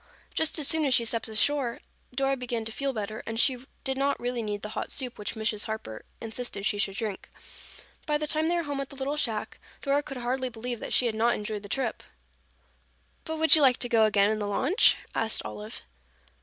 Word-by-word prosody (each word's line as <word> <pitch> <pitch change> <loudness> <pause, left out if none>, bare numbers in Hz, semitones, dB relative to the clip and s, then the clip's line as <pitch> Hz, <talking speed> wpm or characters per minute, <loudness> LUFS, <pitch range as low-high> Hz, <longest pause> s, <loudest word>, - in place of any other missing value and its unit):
Just 320 0 +2
as 300 -3 +1
soon 320 -1 +5
as 265 -3 +5
she 235 - +3
stepped 230 0 -1
ashore, 240 +3 +1 0.3
Dora 270 +1 +1
began 240 -3 -3
to 225 - -3
feel 275 +4 -1
better, 215 -2 -4
and 225 0 -2
she 255 -1 +3 0.2
did 265 0 -1
not 280 +1 +1
really 245 0 -2
need 205 -2 -3
the 210 - -4
hot - - -3
soup 255 -5 -4
which 210 - -4
Mrs. 220 -1 -1
Harper 215 - -6
insisted 225 -2 -4
she 210 -1 +1
should 195 -1 0
drink. 215 -3 -4 0.8
By 300 -1 +2
the 300 - -2
time 310 +1 +1
they 345 - +2
were 340 - 0
home 285 -2 -3
at 275 - -6
the - - -9
little 275 +2 -2
shack, 225 -8 -1 0.2
Dora 280 0 +2
could 275 -2 -7
hardly 255 +1 -1
believe 240 0 -5
that - - -6
she 250 - +4
had 235 - +1
not 230 +2 +2
enjoyed 210 0 -4
the 205 - -10
trip. 255 -2 -1 1.2
"But 320 0 -3
would 320 +1 +7
you 310 - +4
like 255 -3 +5
to 245 - 0
go 225 -2 +5
again 205 -1 +4
in 215 - -1
the 205 - -2
launch?" 270 - +4 0.2
asked 225 0 +1
Olive. 210 +2 -7
240 Hz, 225 wpm, -28 LUFS, 220-275 Hz, 1.2 s, would